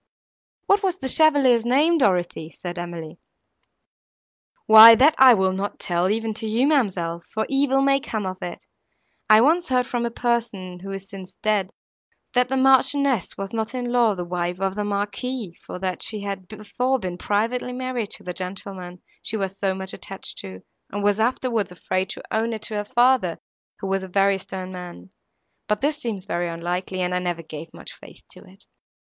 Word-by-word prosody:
"What 400 +1 +3
was 375 -3 0
the 265 - -4
chevalier's 275 -5 +4
name, 295 +8 +3
Dorothée?" 175 - 0
said 175 -1 -6
Emily. 170 -1 -7 1.5
"Why 220 +1 +11
that 280 +6 +5
I 260 -2 +9
will 190 -2 +1
not 195 +2 -4
tell 175 +1 0
even 220 +1 -1
to 220 - -3
you, 230 +5 +2
ma'amselle, 185 - 0
for 220 0 -1
evil 270 0 +2
may 275 0 +3
come 220 -7 -4
of 185 0 -5
it. 175 - -7 0.6
I 215 0 +8
once 330 +6 +2
heard 250 -1 +2
from 240 -2 -2
a - - -3
person, 230 -7 -2
who 195 +2 -9
is 195 0 -6
since 190 -2 -11
dead, 210 -3 +1 0.6
that 250 0 +3
the 265 - 0
Marchioness 265 - +3
was 195 +1 -6
not 225 +2 -2
in 245 -1 -3
law 235 -4 +3
the 180 -1 -5
wife 175 0 -3
of 195 -1 -1
the 210 +1 -3
Marquis, 205 0 -3
for - - -7
that 185 -2 -3
she 215 -2 -2
had 195 -2 -5
before 220 +6 -2
been 180 -6 -6
privately 230 +5 -1
married 250 -4 -3
to - - -9
the 180 - -5
gentleman 185 -1 -7 0.2
she 220 - -3
was 195 -1 -4
so 190 -1 0
much 190 0 -6
attached 195 - -8
to, 95 -1 -9 0.3
and 205 +1 -3
was 205 +1 +2
afterwards 230 -3 0
afraid 185 +1 -2
to - - -7
own 225 +1 0
it 215 -1 -6
to 220 - -5
her 210 0 -2
father, 240 -7 +2 0.4
who - - -4
was 195 0 0
a 190 - -7
very 195 +1 +2
stern 185 0 -7
man; 175 - -9 0.6
but 210 0 0
this 295 +2 0
seems 205 -6 -4
very 175 -3 -2
unlikely, 180 +2 -3
and 180 0 -1
I 180 - +1
never 175 -2 -3
gave 160 +1 -9
much - - -10
faith - - -15
to - - -12
it. - - -19
205 Hz, 190 wpm, -23 LUFS, 185-245 Hz, 1.5 s, Why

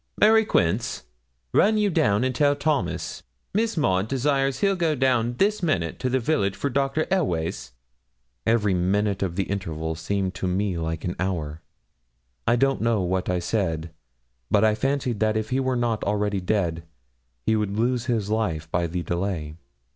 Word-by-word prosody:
Mary 220 +1 +6
Quince, 105 - 0 0.5
run 215 +2 +4
you 210 -2 +2
down 105 -7 +2
and 130 0 0
tell 145 +2 +3
Thomas, 145 0 -1 0.3
Miss 220 0 0
Maud 95 -9 +2
desires 135 +1 0
he'll 195 -1 +3
go 165 -4 +1
down 125 -3 +1
this 205 +4 +2
minute 90 - -1
to 130 - -1
the 130 +1 +1
village 115 -7 0
for 140 - -2
Dr. 140 +4 +1
Elweys.' 85 - -1 0.7
Every 110 -3 +2
minute 100 +3 +1
of 90 -3 -1
the 95 - +1
interval 80 -5 -3
seemed 95 +4 -2
to 95 - -3
me 95 +1 0
like 80 -1 -3
an 90 - -2
hour. 80 -5 -2 0.9
I 120 - +5
don't 135 +2 +1
know 115 -3 +2
what 90 +1 -1
I 90 - +1
said, 85 -3 -1 0.6
but 105 - +3
I 110 -1 +5
fancied 130 0 -1
that 110 0 +2
if 110 +2 -3
he 130 - +2
were 130 -1 0
not 120 -3 0
already 105 -1 0
dead, 90 -4 0 0.6
he 110 - +3
would 105 -1 -1
lose 120 +1 +1
his 110 -4 0
life 85 -8 -1
by 85 -1 +1
the 85 +1 -3
delay. 85 -4 -2
105 Hz, 170 wpm, -25 LUFS, 90-135 Hz, 0.9 s, Mary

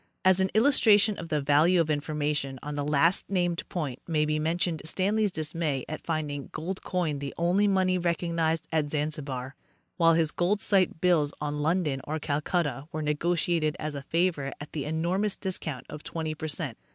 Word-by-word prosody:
As 190 0 +6
an 190 0 +2
illustration 220 -4 +5
of 165 - -7
the 150 -3 +1
value 150 +6 +4
of 160 -2 +2
in 145 - +1
formation 145 -2 -2
on 150 - -4
the 145 0 -2
last 150 +5 +2
named 175 -3 0
point 145 -8 -3
may 155 -3 +2
be 155 0 0
mentioned 165 +1 0
Stanley's 200 +6 +1
dismay 155 -4 -2
at 155 - -6
finding 150 -4 -3
gold 180 +4 -4
coin 165 -6 -1
the 140 0 -5
only 180 +5 +3
money 185 -2 +2
recognized 165 -2 0
at 155 -2 +1
Zan 150 0 0
zibar, 135 -4 -5 0.5
while 165 -1 +5
his 160 -2 +2
gold 190 +4 +1
sight 185 -6 +2
bills 160 -5 +2
on 150 0 -3
London 155 -4 0
or 155 +2 -2
Calcutta 150 -2 -1
were 155 0 -3
nego 150 +4 +1
tiated 160 -2 0
as 155 -1 -4
a 140 - -5
favor 165 -2 0
at 150 - -8
the 145 -4 -3
enormous 175 +7 0
discount 165 -8 -4
of 150 - -8
twenty 160 -1 -4
percent. 155 -5 -4
160 Hz, 185 wpm, -28 LUFS, 150-175 Hz, 0.5 s, As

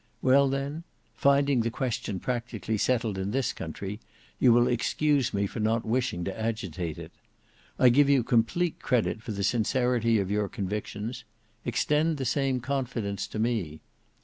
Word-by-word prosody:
Well 135 +1 +5
then, 140 +4 -3 0.3
finding 140 -1 +3
the 115 - 0
question 120 -5 -3
practically 115 -3 -3
settled 115 -5 0
in 95 +1 -2
this 130 +4 0
country, 95 +6 -6 0.4
you 125 - +6
will 120 +1 +5
excuse 135 +2 +1
me 100 0 0
for 100 - -5
not 110 +1 +1
wishing 115 -6 -1
to 95 +2 -4
agitate 95 -8 -3
it. - - -9 0.7
I 125 - +6
give 140 +3 +4
you 135 -3 +4
complete 120 +10 +1
credit 120 -3 0
for 115 - -6
the 100 -1 -3
sincerity 115 +2 +2
of 100 -1 -1
your 105 -1 0
convictions; 105 +4 -4 0.4
extend 155 +1 +1
the 135 - -3
same 135 -1 0
confidence 120 -6 -2
to - - -7
me. 110 -9 -1
120 Hz, 155 wpm, -28 LUFS, 105-130 Hz, 0.7 s, you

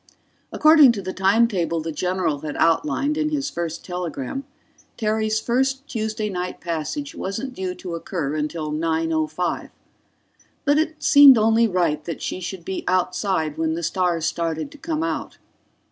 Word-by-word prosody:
According 305 -5 +7
to 205 - -4
the 185 0 -4
time 200 +5 +3
table 170 -6 -1
the 160 +1 -4
general 180 -2 -1
had 150 0 -6
outlined 290 - +1
in 305 0 +1
his 295 -1 -2
first 170 -2 -4
telegram, 180 - -4 0.5
Terry's 220 0 0
first 265 +4 0
Tuesday 220 -3 -2
night 180 -2 -4
passage 170 - -4
wasn't 225 +8 -4
due 185 -4 -4
to 180 -2 -7
occur 155 -3 -3
till 155 -1 -5
9:05. 160 +1 -1 1.0
But 290 +1 +4
it 315 0 -2
seemed 285 -3 +8
only 225 +1 +4
right 170 -6 0
that 165 - -5
she - - -3
should 180 -1 -6
be 190 - -4
outside 180 -3 0
when 160 0 0
the 170 - -4
stars 170 -1 0
started 165 - -2
to 295 - -14
come 320 0 -2
out. 330 - -3
185 Hz, 155 wpm, -22 LUFS, 165-240 Hz, 1.0 s, seemed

